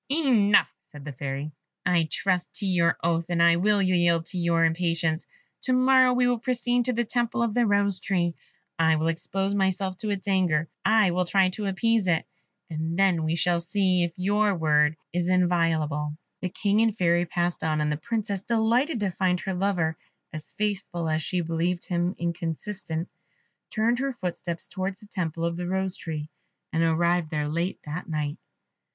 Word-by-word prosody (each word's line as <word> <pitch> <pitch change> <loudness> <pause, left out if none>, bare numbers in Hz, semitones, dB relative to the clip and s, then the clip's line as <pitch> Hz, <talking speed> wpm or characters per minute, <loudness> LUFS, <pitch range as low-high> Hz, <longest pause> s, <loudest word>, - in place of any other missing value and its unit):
"Enough," 250 -9 +3
said 150 -4 -13
the 145 - -5
Fairy; 140 +3 -4 0.3
"I 175 -3 +2
trust 185 -2 -1
to 205 - -4
your 175 -3 +2
oath, 170 0 +1
and 175 -1 0
I 170 0 +5
will 205 +2 +3
yield 175 -3 +2
to 185 - -6
your 170 -1 +3
impatience. 165 0 0 0.4
To 255 - +2
morrow 255 0 +5
we 250 0 +2
will 245 -1 +1
proceed 245 0 0
to 250 - 0
the 240 +1 +1
temple 235 +1 0
of 230 -3 -1
the 240 0 +2
Rose 200 -2 +2
tree. 175 -3 0 0.5
I 160 -1 +4
will 160 +1 0
expose 195 +4 -2
myself 190 -1 0
to 215 - -3
its 200 -1 -3
anger. 175 -5 +2 0.2
I 215 -4 +4
will 180 +1 0
try 190 +1 +3
to 200 +2 -4
appease 220 +1 +1
it, 165 -2 +1 0.4
and 160 +1 -3
then 190 -4 +3
we 160 +1 0
shall 170 +1 +2
see 185 +1 +1
if 170 -1 -4
your 205 +2 +2
word 150 -2 +2 0.2
is 175 0 0
inviolable." 160 -5 +1 0.2
The 185 - -2
King 205 +4 +1
and 225 0 +3
the - - -23
Fairy 175 -1 +2
passed 175 +1 -1
on, 155 -1 0
and 150 0 0
the 150 - -1
Princess, 210 -1 -2
delighted 235 +5 +1
to 200 -2 0
find 180 0 0
her 195 - -3
lover 180 -4 0 0.3
as 155 0 -6
faithful 195 -5 -2
as 155 0 0
she 180 - -2
had 175 - 0
believed 170 +2 -1
him 175 +1 -1
inconstant, 170 +1 -4 0.6
turned 235 +2 +1
her 275 0 -1
footsteps 175 -5 -4
towards 190 +1 -4
the - - -13
temple 170 -5 -3
of 170 0 -2
the 175 0 -4
Rose 190 0 -1
tree, 155 -2 -5 0.5
and 160 - +1
arrived 170 0 +2
there 150 -1 -1
late 170 +5 -2
at 155 +4 -6
night. 150 -2 -2
180 Hz, 185 wpm, -26 LUFS, 165-205 Hz, 0.6 s, I